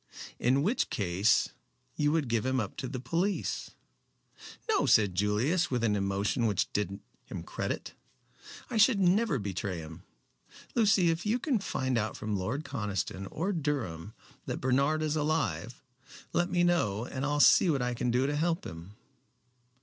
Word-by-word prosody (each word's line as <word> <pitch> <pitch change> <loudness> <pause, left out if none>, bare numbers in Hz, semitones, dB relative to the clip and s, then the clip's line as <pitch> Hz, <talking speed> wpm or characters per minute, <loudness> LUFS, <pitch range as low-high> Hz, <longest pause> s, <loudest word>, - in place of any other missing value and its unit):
"In 130 +3 +2
which 215 +9 +1
case 100 +2 +2 0.5
you 150 0 +2
would 155 -4 +1
give 115 -2 0
him 130 0 0
up 105 -4 -3
to 130 - -4
the 130 0 -5
police." 170 +11 -1 1.0
"No," 435 -3 +2
said 105 -4 +4
Julius 110 - +1
with 125 -3 -1
an 105 -3 +2
emotion 100 +4 0
which 100 -4 0
did 100 -1 -2 0.3
him - - -7
credit, - - -4 0.8
"I 235 - -1
should 215 0 +5
never 190 -3 +3
betray 100 -3 -3
him. 80 +1 -9 0.7
Lucy, 205 -6 +4
if 165 +2 -3
you 215 +3 +1
can 250 -2 0
find 130 -9 -1
out 110 0 -3
from 105 -1 -3
Lord 110 +10 -2
Conniston 100 -2 -3
or 185 +7 -2
Durham 115 - -3 0.3
that - - -2
Bernard 140 +5 +1
is 155 0 0
alive, 150 -5 -1 0.5
let 175 +1 +1
me 175 -1 +2
know 120 - +1
and 130 +1 -5
I'll 145 0 0
see 175 - +6
what 140 -5 +1
I 125 0 -1
can 120 +1 -1
do 125 +2 +2
to 145 +1 0
help 165 +3 0
him." 85 +5 -9
130 Hz, 165 wpm, -30 LUFS, 105-165 Hz, 1.0 s, see